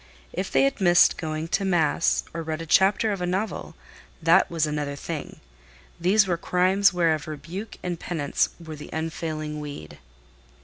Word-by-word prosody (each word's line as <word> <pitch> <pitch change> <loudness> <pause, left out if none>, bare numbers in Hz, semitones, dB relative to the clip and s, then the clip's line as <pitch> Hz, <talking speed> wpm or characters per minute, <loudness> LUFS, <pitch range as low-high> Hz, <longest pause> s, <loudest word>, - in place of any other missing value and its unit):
If - - -3
they 135 - +4
had 135 +8 0
missed 175 -2 +6
going 155 0 -4
to 185 +3 0
mass, 170 -4 +2
or 165 - -3
read 160 0 -4
a 165 - -5
chapter 195 +6 +3
of 200 -3 -3
a 180 - -1
novel, 190 +5 -3 0.4
that 170 +3 +4
was 165 -2 +1
another 150 -1 -3
thing: 140 - -6 0.6
these 195 +5 +4
were 175 -3 0
crimes 185 +3 +3
whereof 165 -3 +1
rebuke 170 +8 -7
and 175 -2 -3
penance 150 -5 -1
were 160 -2 -8
the 150 - -10
unfailing 155 -1 -4
weed. 145 - -8
165 Hz, 165 wpm, -25 LUFS, 155-180 Hz, 0.6 s, missed